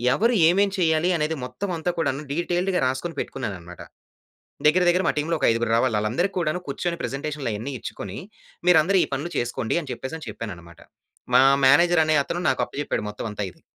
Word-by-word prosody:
ఎవరు 230 +4 +2 0.2
ఏమేం 200 +3 +3
చేయాలి, 160 0 +2
అనేది 155 +1 -1
మొత్తం 195 +10 -5
అంతా 160 +2 -2
కూడాను 140 -3 0
డీటెయిల్డ్‌గా 175 +3 0
రాసుకొని 135 +6 -3
పెట్టుకున్నాను 110 -7 -4
అన్నమాట. 90 +1 -12 0.9
దగ్గర, 180 +4 +4
దగ్గర 180 +2 +2
మా - - +4
టీమ్‌లో 160 +3 0
ఒక - - +1
ఐదుగురు 115 0 0
రావాలి, 115 +1 +2
వాళ్ళందరికి 120 - 0
కూడాను 170 0 -1
కూర్చొని 170 +5 -2
ప్రజెంటేషన్‌లు 140 -1 -3
అయన్నీ 110 +7 -5
ఇచ్చుకొని, 100 -2 -7 0.5
మీరందరూ 180 +2 +5
ఈ - - 0
పనులు 145 +6 -3
చేసుకోండి 120 +2 -1
అని 150 - -10
చెప్పేసి 130 +4 -6
అని 155 - -10
చెప్పాను 110 -1 -6
అన్నమాట. 85 0 -15 0.6
మా - - +8 0.3
మేనేజర్ 170 +4 +5
అనే 155 0 +2
అతను, 175 +5 -4
నాకు 130 - +1
అప్పచెప్పాడు 145 -5 -3
మొత్తం 105 - -7
అంతా 105 0 -4
ఇది. - - -25
150 Hz, 185 wpm, -24 LUFS, 120-175 Hz, 0.9 s, మా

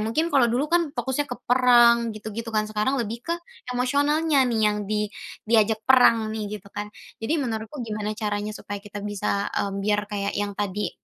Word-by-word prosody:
mungkin 230 +10 0
kalau 265 -4 +5
dulu 255 +6 +1
kan 340 -2 +1
fokusnya 270 +2 -1
ke 245 - -3
perang, 240 -2 +5
gitu-gitu 220 +2 -6
kan, 215 -1 0
sekarang 215 +6 0
lebih 230 +1 -3
ke - - +2 0.4
emosionalnya 285 +4 +2
nih 225 -2 0
yang 210 - +1
di 210 0 +1 0.4
diajak 220 -1 +3
perang 230 -4 +5
nih, 210 -1 -4
gitu 200 - -21
kan. 205 0 -5 0.3
Jadi 310 +8 0
menurutku 230 0 -4
gimana 210 -1 -3
caranya 210 -1 -2
supaya 205 -1 -7
kita 205 -1 -8
bisa, 200 0 -1
mmm, 200 0 -1
biar 210 +1 +1
kayak 200 -1 -2
yang 205 0 -1
tadi, 205 0 -2
220 Hz, 180 wpm, -24 LUFS, 210-250 Hz, 0.4 s, kalau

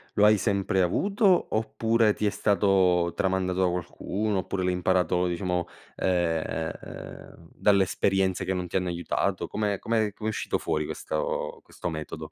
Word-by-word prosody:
lo 105 - +5
hai 105 0 +6
sempre 100 -2 +1
avuto, 195 - +2
oppure 115 0 +2
ti 105 - -2
è - - +4
stato 95 -4 +2
tramandato 95 -1 0
da 95 - +4
qualcuno, 95 +4 -2
oppure 95 0 -3
l'hai 90 0 +1
imparato 90 0 +1
diciamo, 90 0 -1 0.3
ehm, 80 -3 -3
dalle 100 -2 +3
esperienze 95 0 0
che 95 - 0
non 90 -1 -3
ti - - -9
hanno 90 -1 +1
aiutato? 85 0 -1
Come 105 -2 -1
come 110 -2 0
com'è 110 +2 -3
uscito 110 - -1
fuori 75 0 -1
questo 75 +1 -3
questo - - -6
metodo? 80 -1 -6
95 Hz, 150 wpm, -27 LUFS, 90-105 Hz, 0.3 s, hai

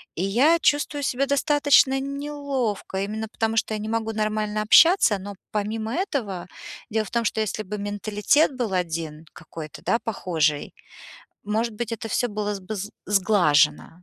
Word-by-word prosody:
И 180 - -2
я 255 +12 +4
чувствую 290 0 +1
себя 265 +1 0
достаточно 280 -1 +3
неловко, 275 -8 -3
именно 220 +2 -4
потому, 225 0 -2
что 220 0 +1
я - - -1
не 215 +1 -5
могу 225 -1 -1
нормально 215 0 -1
общаться, 225 - +6
но 200 +2 -7 0.2
помимо 220 +2 -2
этого, 230 - -3 0.4
дело 220 -1 0
в - - -11
том, 235 -1 0
что 220 - 0
если 215 0 -2
бы 210 +1 -5
менталитет 210 +8 +1
был 240 -5 -2
один 165 -3 -3
какой-то, 155 -1 -10
да, 230 - +1
похожий, 160 -10 -1 0.7
может 220 +3 -1
быть, 235 +1 -4
это 230 0 -5
всё 245 +3 0
было 210 -1 -3
бы 185 +3 -6
з 205 +3 -5 0.2
сглажено. 175 - +2
215 Hz, 160 wpm, -24 LUFS, 200-245 Hz, 0.7 s, общаться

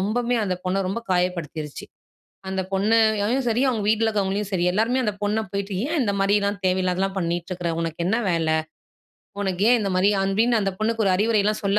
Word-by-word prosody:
ரொம்பவுமே 240 +5 0
அந்த 185 - -1
பொண்ணை 185 +2 0
ரொம்ப 200 +5 -2
காயப்படுத்திருச்சி. 170 -5 -2 0.7
அந்த 190 0 -1
பொண்ணையும் 220 +4 +2
சரி, 235 +2 +1
அவங்க 225 -4 -1
வீட்டில 220 +1 +2
இருக்கிறவங்களையும் 205 -1 -1
சரி 175 -2 +1
எல்லாருமே 230 +6 +1
அந்த 210 -3 0
பொண்ணை 210 +2 +1
போயிட்டு, 200 0 -3
"ஏன் 320 +2 -1
இந்த 205 - 0
மாதிரிலாம் 200 0 +1
தேவையில்லாதலாம் 185 +1 0
பண்ணிட்டு 170 +1 -2
இருக்க? 175 -2 -2
உனக்கு 165 0 -4
என்ன 220 - +2
வேலை? 165 -2 +1 0.9
உனக்கு 190 -1 -2
ஏன் 245 - +5
இந்த 200 -2 -1
மாதிரி?" 195 +3 +4
அப்படின்னு 220 +4 +2
அந்த 195 -1 -1
பொண்ணுக்கு 220 0 0
ஒரு 185 - +3
அறிவுரைலாம் 215 0 +1
சொல்ல 200 +1 +2
200 Hz, 180 wpm, -23 LUFS, 185-220 Hz, 0.9 s, ஏன்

